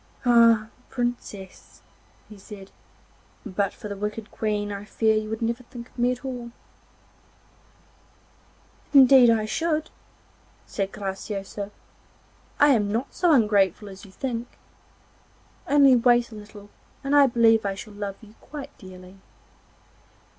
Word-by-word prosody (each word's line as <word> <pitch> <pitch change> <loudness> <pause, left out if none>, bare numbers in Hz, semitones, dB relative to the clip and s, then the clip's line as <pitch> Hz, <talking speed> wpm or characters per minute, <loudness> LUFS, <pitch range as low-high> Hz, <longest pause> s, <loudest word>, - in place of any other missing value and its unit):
'Ah, 230 -2 +5 0.2
Princess!' 240 -6 -6 0.4
he 215 - -13
said, 195 0 -12 0.7
'but 200 -1 -1
for - - -10
the 200 - -5
wicked 210 +2 -5
Queen 210 -1 -2
I 200 0 -6
fear 220 +1 +1
you 215 0 -2
would 220 +1 -4
never 235 +2 -1
think 240 -1 -11
of - - -15
me 245 +1 +3
at 250 +1 -6
all.' 245 -2 -5 2.5
'Indeed 260 -2 +8
I 225 -2 +2
should,' 315 +7 -2 0.7
said 195 -1 -3
Graciosa; 195 0 -5 0.9
'I 290 - +6
am 210 -7 +2
not 230 +5 -3
so 350 -2 +2
ungrateful 210 - +2
as 190 +2 -12
you 200 - -13
think. 235 +3 -4 1.2
Only 280 -2 +6
wait 240 0 +3
a - - -10
little 205 -1 -13 0.3
and 275 +1 0
I 285 -1 +7
believe 225 -2 +3
I 200 -1 -2
shall 210 +2 -10
love 205 -1 -5
you 215 -1 -16
quite 290 -2 -9
dearly. 185 -2 -13
220 Hz, 130 wpm, -24 LUFS, 205-245 Hz, 2.5 s, Indeed